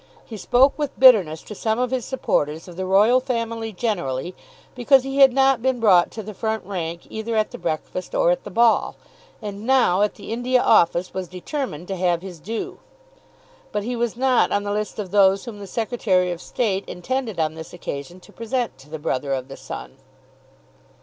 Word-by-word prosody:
He 225 - -9
spoke 255 +8 +3
with 290 -2 -3
bitterness 195 -12 +6
to - - -9
some 220 +2 -1
of 250 0 -1
his 255 -3 -1
supporters 160 - -1
of 175 - -10
the 190 +1 -4
Royal 210 +7 +5
Family 230 -3 -3
generally, 180 - -2 0.4
because 255 +1 +4
he 270 +1 -4
had 270 -2 +7
not 270 -1 +3
been 260 0 0
brought 190 -6 +5
to 220 - -7
the 215 +1 -8
front 220 0 -3
rank 170 -3 -4
either 220 +1 -3
at 215 -1 +1
the 245 - -8
breakfast 170 - -4
or - - +4
at - - -1
the - - -8
ball, 230 0 +3 0.5
and 205 -1 -6
now, 240 -7 +3
at 210 - +1
the - - -7
India 250 +2 +1
Office, 175 -4 +3
was 190 -1 -4
determined 180 - -5
to 195 - -3
have 175 -1 0
his 180 -4 -9
due. 215 +8 -5 0.9
But 210 -1 -2
he 245 +3 -3
was 235 -1 -2
not 260 -1 +3
on 205 - +1
the 205 - -3
list 210 0 -3
of 200 -4 -5
those 195 0 +4
whom 225 -4 -8
the 200 - -8
Secretary 200 -5 0
of 175 0 -6
State 200 -4 -1
intended 225 +1 -3
on 155 -1 0
this 160 0 -9
occasion 175 0 -7
to - - -18
present 230 - -3
to 135 +3 -16
the 160 - -5
Brother 140 -2 -2
of 130 -1 -4
the - - -8
Sun. - - -9
210 Hz, 200 wpm, -22 LUFS, 180-245 Hz, 0.9 s, had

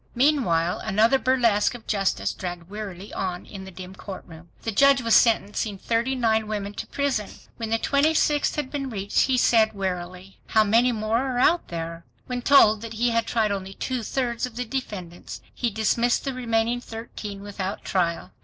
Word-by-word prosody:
Meanwhile 235 - +2
another 220 +5 +3
burlesque 240 -5 +2
of 235 - -11
justice 195 -2 0
dragged 175 -1 -7
wearily 205 -2 -7
on 180 -2 -3
in 195 -2 -9
the - - -9
dim 185 0 -9
courtroom. 175 -3 -10
The 225 - -1
judge 275 +4 +5
was 230 -1 +4
sentencing 210 -2 +2
thirty 235 +6 0
nine 220 -3 +1
women 205 -1 -3
to - - -6
prison. 270 -8 -1 0.3
When 225 -2 -4
the 225 - +2
twenty 285 +6 +2
sixth 295 -1 +2
had 290 -3 -3
been 275 -2 -3
reached, 200 0 0
he 260 -2 +2
said 225 -3 +4
wearily, 185 -1 -5
"How 220 -1 +4
many 230 +4 +4
more 220 0 0
are 260 -1 -2
out 330 +7 +3
there?" 165 0 -5 0.2
When 250 -1 -3
told 220 -6 +6
that 230 -1 -7
he 235 +2 +1
had 230 0 +1
tried 220 -3 +1
only 195 -1 -4
two 255 -2 -3
thirds 240 +1 -2
of 235 - -14
the 250 +1 -3
defendants, 205 -9 -6
he 240 - -1
dismissed 230 +3 +1
the 270 - -2
remaining 235 -1 0
thirteen 225 -3 -7
without 200 -1 -5
trial! 170 -3 -1
220 Hz, 180 wpm, -25 LUFS, 195-245 Hz, 0.3 s, told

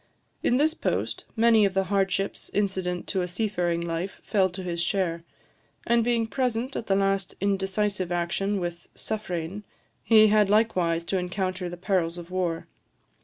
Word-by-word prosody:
In 245 - +2
this 310 +3 +3
post, - - -2
many 225 -1 +5
of 195 -1 +1
the 195 - +3
hardships 195 0 -1
incident 190 -3 -1
to 190 - 0
a 180 - -1
seafaring 180 -3 -1
life 170 +3 -3
fell 190 -3 +2
to 185 +1 -7
his 170 -1 -2
share; 170 -2 0 0.6
and 235 0 +3
being 235 -1 +1
present 250 +1 -1
at 225 - -4
the 195 - +3
last 195 -1 0
indecisive 195 -1 0
action 190 +4 0
with 175 -1 -5
"Suffrein," 190 -3 -4 0.4
he 215 -2 +6
had 210 -1 +4
likewise 185 -6 +2
to 190 +2 -1
encounter 185 0 -2
the 175 - -7
perils 175 -2 0
of 175 +1 -9
war. 175 -3 -1
190 Hz, 160 wpm, -26 LUFS, 175-210 Hz, 0.6 s, he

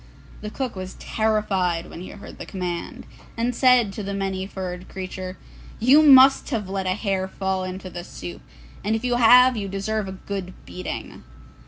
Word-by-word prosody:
The 210 - -5
cook 255 +1 -4
was 185 0 -7
terrified 195 -6 0
when 170 - -9
he 185 - -8
heard 200 - -11
the - - -6
command, 180 -3 -5 0.3
and 240 +2 0
said 245 -5 +4
to 210 - -5
the 200 0 -4
Many 190 -1 -2
furred 185 -2 -6
Creature, 185 0 -6 0.4
'You 260 +7 +6
must 270 -2 +7
have 220 -8 -2
let 190 0 -3
a 185 - +1
hair 195 -3 -1
fall 190 -1 -2
into 185 +1 -6
the 175 0 -6
soup, 90 - -9 0.4
and 215 +2 +1
if 225 - -3
you 245 -1 +1
have 250 +2 +7
you 205 -3 -3
deserve 195 +2 -2
a 190 - -5
good 190 -1 -6
beating! 185 - -7
195 Hz, 180 wpm, -23 LUFS, 185-225 Hz, 0.4 s, must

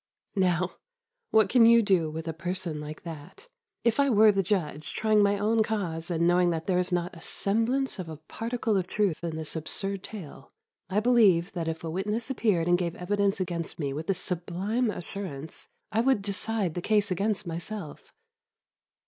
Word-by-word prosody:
Now, 180 -1 +1 0.5
what 220 -2 +5
can 230 +2 +6
you 235 0 +7
do 185 -6 +2
with 160 +1 -6
a 165 - -2
person 175 -2 -3
like 150 +1 -8
that? 165 - -10 0.4
If 235 +2 +2
I 280 0 +4
were 215 -2 +6
the 195 -1 +1
judge, 170 -6 -2
trying 215 -1 +3
my 200 0 +3
own 220 +2 +2
cause 180 -7 -2
and 170 -1 +1
knowing 175 0 +4
there 175 +2 0
is 180 0 -1
not 175 0 -1
a 165 - -12
semblance 230 +7 0
of 175 -3 -5
a 155 - -7
particle 225 - -2
of 185 -1 -1
truth 195 -6 0
in 165 -2 -3
this 160 0 -5
absurd 195 +5 -3
tale, 170 -10 -9 0.4
I 200 +2 +1
believe 210 -7 +4
that 170 -3 -4
if 160 0 -3
a 165 - -3
witness 210 +8 -1
appeared 205 -9 +1
and 175 0 +4
gave 170 -1 -2
evidence 200 +2 0
against 170 -3 -3
me 140 -4 -2
with 155 +3 -5
this 195 - +1
sublime 190 +7 -1
assurance, 170 -6 -6 0.2
I 220 - +2
would 250 -5 +2
decide 200 -2 -1
the 175 - -3
case 210 0 +2
against 205 +2 0
myself. 170 0 -6
185 Hz, 180 wpm, -28 LUFS, 170-215 Hz, 0.5 s, you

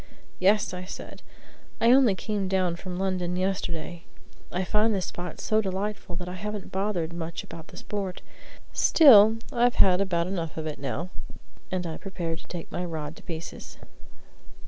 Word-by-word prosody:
"Yes," 205 +2 +3
I 180 0 -5
said, 185 - -9 0.6
"I 230 - +5
only 255 -6 +6
came 205 -1 -2
down 185 -2 +1
from 180 +1 -6
London 185 -2 -1
yesterday. 175 -3 -2 0.5
I 180 +1 -1
find 215 +3 +2
the - - +1
spot 175 -1 -5
so 215 0 +2
delightful 195 -1 -3
that 175 +1 -5
I 180 - -5
haven't 210 +1 -5
bothered 190 -4 -1
much 170 -1 -5
about 160 - -10
the - - -13
sport. 195 -3 -4 0.5
Still, 225 -8 +8 0.2
I've 245 0 +3
had 185 0 +5
about 170 -4 +1
enough 170 -4 -3
of 160 - -3
it 155 -1 -4
now." 160 +6 -3 0.6
And 185 -1 -2
I 160 -1 -4
prepared 170 -4 -4
to - - -15
take 175 -2 -7
my 180 - -2
rod 160 -3 -4
to - - -12
pieces. 165 -1 -7
185 Hz, 170 wpm, -27 LUFS, 170-205 Hz, 0.6 s, Still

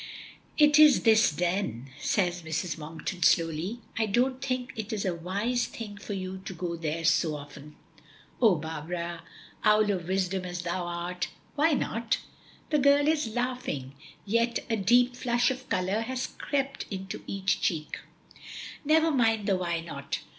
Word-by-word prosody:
"It 295 0 +6
is 300 -3 +7
this 220 -1 +6
then," 150 - -2
says 180 -2 0
Mrs. 160 +1 -2
Monkton 160 +3 -6
slowly. 165 +8 +2 0.2
"I 220 - +2
don't 255 +5 +1
think 255 -1 -2
it 220 -2 -5
is 210 -3 -2
a 185 - +1
wise 200 +9 -1
thing 210 -3 -8
for 205 - -6
you 190 -1 -5
to 190 - -6
go 170 0 -3
there 165 0 -3
so 160 -1 +3
often." 145 +1 -10 0.7
"Oh 220 -6 +6
Barbara! 165 +2 -4 0.4
Owl 215 -1 +4
of 180 -4 -3
Wisdom 190 0 0
as 175 -1 -5
thou 175 +1 -2
art, 175 +1 -3 0.3
why 310 +2 +3
not?" 230 -4 0 0.5
The 300 - +4
girl 280 +1 +5
is 310 -5 +2
laughing, 245 - -2 0.3
yet 230 +3 +1
a - - +3
deep 240 +5 +4
flush 245 0 +2
of 260 0 -7
color 190 +4 0
has 255 +2 -2
crept 275 -1 -3
into 190 -1 -6
each 195 0 0
cheek. 155 -5 -1 0.8
"Never 320 +2 +4
mind 225 -6 +2
the 195 - +3
why 170 -2 -1
not. 140 -4 -5
195 Hz, 155 wpm, -28 LUFS, 170-245 Hz, 0.8 s, is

